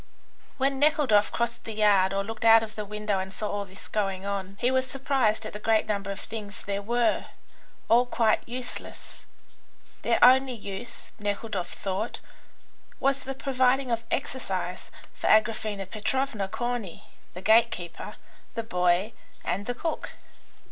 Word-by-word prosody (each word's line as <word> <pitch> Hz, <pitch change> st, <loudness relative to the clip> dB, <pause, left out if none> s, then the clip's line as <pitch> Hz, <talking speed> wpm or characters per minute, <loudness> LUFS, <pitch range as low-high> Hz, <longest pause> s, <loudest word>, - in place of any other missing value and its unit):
When 270 Hz, 0 st, +1 dB
Nekhludoff 290 Hz, -8 st, +4 dB
crossed 235 Hz, 0 st, -2 dB
the 225 Hz, -, -6 dB
yard 200 Hz, -3 st, +4 dB
or 195 Hz, 0 st, 0 dB
looked 225 Hz, +2 st, -6 dB
out 225 Hz, 0 st, +8 dB
of 215 Hz, -1 st, -7 dB
the 210 Hz, -1 st, -5 dB
window 210 Hz, -1 st, -1 dB
and 190 Hz, 0 st, -4 dB
saw 210 Hz, +2 st, -3 dB
all 205 Hz, 0 st, -2 dB
this 190 Hz, 0 st, -13 dB
going 195 Hz, -2 st, -1 dB
on, 200 Hz, -1 st, -4 dB
he 250 Hz, +1 st, +2 dB
was 260 Hz, 0 st, +1 dB
surprised 265 Hz, -5 st, +1 dB
at -, -, -6 dB
the 210 Hz, -, -6 dB
great 220 Hz, 0 st, +2 dB
number 200 Hz, -2 st, -2 dB
of 200 Hz, 0 st, -4 dB
things 210 Hz, -2 st, -7 dB
there 200 Hz, 0 st, -2 dB
were, 235 Hz, +3 st, +1 dB, 0.6 s
all 240 Hz, +2 st, +5 dB
quite 225 Hz, -3 st, +2 dB
useless. 245 Hz, +1 st, -7 dB, 0.7 s
Their -, -, +2 dB
only 260 Hz, 0 st, +5 dB
use, 215 Hz, +2 st, -7 dB
Nekhludoff 205 Hz, -2 st, -2 dB
thought, 195 Hz, +4 st, -3 dB, 0.8 s
was 275 Hz, 0 st, +2 dB
the 270 Hz, 0 st, -4 dB
providing 260 Hz, -1 st, +2 dB
of 230 Hz, 0 st, 0 dB
exercise 260 Hz, 0 st, -3 dB, 0.2 s
for -, -, -3 dB
Agraphena 215 Hz, -2 st, +2 dB
Petrovna, 220 Hz, 0 st, -1 dB
Corney, 225 Hz, -3 st, -3 dB, 0.3 s
the 180 Hz, -, -6 dB
gate 225 Hz, +3 st, +6 dB
keeper, 175 Hz, -5 st, -6 dB, 0.4 s
the 230 Hz, -, -2 dB
boy, 180 Hz, 0 st, +1 dB, 0.3 s
and 200 Hz, +3 st, -2 dB
the 245 Hz, -, -1 dB
cook. 325 Hz, +5 st, -3 dB
220 Hz, 155 wpm, -27 LUFS, 200-245 Hz, 0.8 s, out